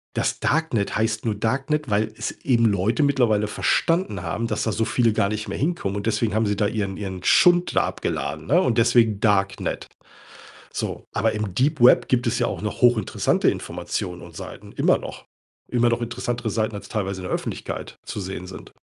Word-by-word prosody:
Das - - 0
Darknet 145 -10 0
heißt 110 0 0
nur 110 -2 0
Darknet, 135 +7 -1
weil 110 +1 +1
es 115 - -3
eben 120 -3 +1
Leute 105 +6 +2
mittlerweile 120 -7 +2
verstanden 170 - 0
haben, 115 - -2
dass 110 -2 -2
da 110 - 0
so 110 +2 0
viele 115 -2 +2
gar 100 -2 +1
nicht 110 +1 -3
mehr - - -4
hinkommen 145 - -1
und 100 - -4
deswegen 115 -1 0
haben 110 +1 +2
sie 105 - 0
da 105 - +1
ihren 100 -3 -3
ihren 95 -3 -6
Schund 175 0 +4
da - - +4
abgeladen, 75 +2 -4
ne, 165 +6 +4
und 125 -8 +1
deswegen 115 -3 +4
Darknet. 100 -3 0 0.9
So, - - -4
aber 110 +1 +1
im 105 -4 -3
Deep 140 +6 +1
Web 125 - +6
gibt 125 -1 +1
es 115 - +1
ja - - +2
auch - - -4
noch 105 - -4
hochinteressante 120 -4 +3
Informationen 90 -1 -4
und - - -12
Seiten, - - -9
immer - - +3
noch. - - -9 0.4
Immer 120 -1 +2
noch 115 - 0
interessantere 120 0 -3
Seiten, 110 0 -1
als 100 - -9
teilweise 100 -3 -3
in - - -5
der - - -4
Öffentlichkeit - - -5
zu - - -5
sehen 95 -1 -6
sind. 90 - -10
110 Hz, 195 wpm, -23 LUFS, 100-120 Hz, 0.9 s, Web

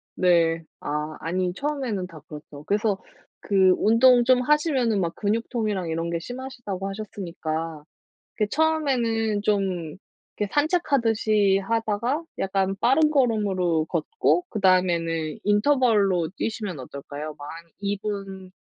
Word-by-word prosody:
네. 165 -2 +3 0.2
아 150 +1 -3
아니 180 +2 -1
처음에는 260 -10 -2
다 165 -4 -12
그렇죠. 150 -1 -10
그래서 205 -1 0 0.4
그 190 -2 +4
운동 240 +3 +5
좀 250 0 +4
하시면은 265 - +2
막 170 -2 -1
근육통이랑 215 -3 -1
이런 165 +1 -2
게 170 - -1
심하시다고 240 -4 -6
하셨으니까. 165 -7 -5 0.5
이렇게 210 -2 +1
처음에는 245 -9 +1
좀 190 -6 -1 0.4
그 210 - -1
산책하듯이 225 - +2
하다가 225 - -1 0.2
약간 195 0 0
빠른 290 +5 +4
걸음으로 200 - +1
걷고 400 - 0
그다음에는 170 -5 +1
인터벌로 210 - +3
뛰시면 210 -9 -3
어떨까요? 145 +3 -7
막 145 - -8
한 165 0 -12
2 200 0 -1
분 195 -3 -5
200 Hz, 285 characters per minute, -24 LUFS, 170-235 Hz, 0.5 s, 운동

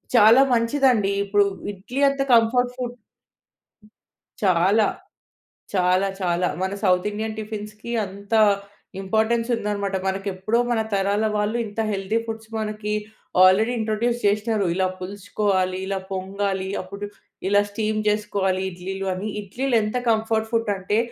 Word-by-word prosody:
చాలా 230 +3 +8
మంచిదండి. 230 -3 +3
ఇప్పుడు 200 0 +3 0.3
ఇడ్లీ 225 +8 -5
అంత 275 0 -2
కంఫర్ట్ 245 +2 +3
ఫుడ్ 245 -1 -4 1.5
చాలా. 195 +3 +4 0.9
చాలా 185 0 +3
చాలా. 180 0 +1
మన 190 - -1
సౌత్ 180 0 +3
ఇండియన్ 220 +1 -4
టిఫిన్స్‌కి 215 +1 -7
అంత 200 +2 -9 0.7
ఇంపార్టెన్స్ 220 +4 +1
ఉందనమాట. 200 -3 -2
మనకెప్పుడో 195 +3 -1
మన 235 - +2
తరాల 200 +2 +1
వాళ్ళు 210 +3 0
ఇంత 210 +1 -7
హెల్తీ 195 +2 -1
ఫుడ్స్ 220 -1 -7
మనకి 210 -1 -3 0.5
ఆల్రెడీ 205 +6 +5
ఇంట్రొడ్యూస్ 225 +2 0
చేసినరు. 210 0 +1
ఇలా 185 0 +2
పులుసుకోవాలి, 190 -1 -1
ఇలా 195 -1 -1
పొంగాలి. 190 0 -2
అప్పుడు 200 +2 -7 0.4
ఇలా 205 0 +5
స్టీమ్ 215 +1 -1
చేసుకోవాలి 200 -3 0
ఇడ్లీలు 190 +2 -5
అని. 190 +3 -4
ఇడ్లీలు 240 +6 -2
ఎంత 215 +3 -2
కంఫర్ట్ 220 0 +1
ఫుడ్ 225 -2 +1
అంటే 190 +3 -1
205 Hz, 120 wpm, -23 LUFS, 195-220 Hz, 1.5 s, చాలా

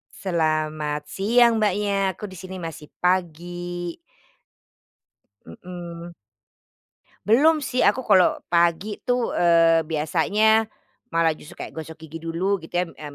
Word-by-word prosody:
Selamat 155 -4 -1
siang 235 +4 +3
Mbaknya, 200 -2 +1
aku 210 +4 -8
di 190 - -11
sini 185 +1 -8
masih 160 -3 -8
pagi. 175 0 -2 1.5
Mmm. 170 - -9 1.1
Belum 295 +8 +4
sih 255 -2 +1
aku 260 - +2
kalau 190 -6 +4 0.2
pagi 175 +4 +1
tuh, 245 -1 +1
eee, 165 -2 +4
biasanya, 200 +8 +2 0.5
malah 165 -1 +3
justru - - -13
kayak - - -7
gosok 160 0 -9
gigi 160 +1 -8
dulu 170 +5 -1
gitu 165 0 -14
ya, - - 0
eee, 145 -1 -8
175 Hz, 120 wpm, -23 LUFS, 160-200 Hz, 1.5 s, Belum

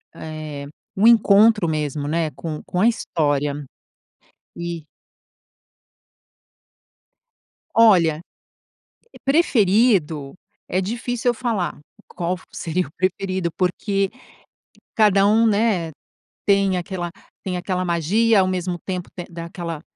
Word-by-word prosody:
eh, 155 -2 -7 0.3
um 200 +3 +2
encontro 215 -3 +5
mesmo, 150 -2 -2
né, 160 0 0
com 155 +3 -6
com 180 - -3
a 225 - +5
história. 145 -8 -1 0.9
E 170 -2 -5 2.9
Olha, 175 -9 +5 0.9
eh, - - -13
preferido, 205 - +2 0.3
é 185 - 0
difícil 240 +4 -2
eu 240 - +2
falar 225 - -2 0.3
qual 180 +1 -3
seria 175 +1 -2
o - - -17
preferido. 185 -1 -1
Porque 195 +2 0 0.9
cada 200 -2 +4
um, 225 +2 +4
né, 205 -6 +1 0.6
tem 195 -2 +3
aquela 175 -1 -4 0.3
tem 180 -2 -2
aquela 185 0 -2
magia. 195 +6 +2
Ao 185 - +1
mesmo 180 -1 -2
tempo 180 -2 -4 0.2
dá 170 -1 -7
aquela 170 -2 -6
185 Hz, 105 wpm, -21 LUFS, 165-210 Hz, 2.9 s, encontro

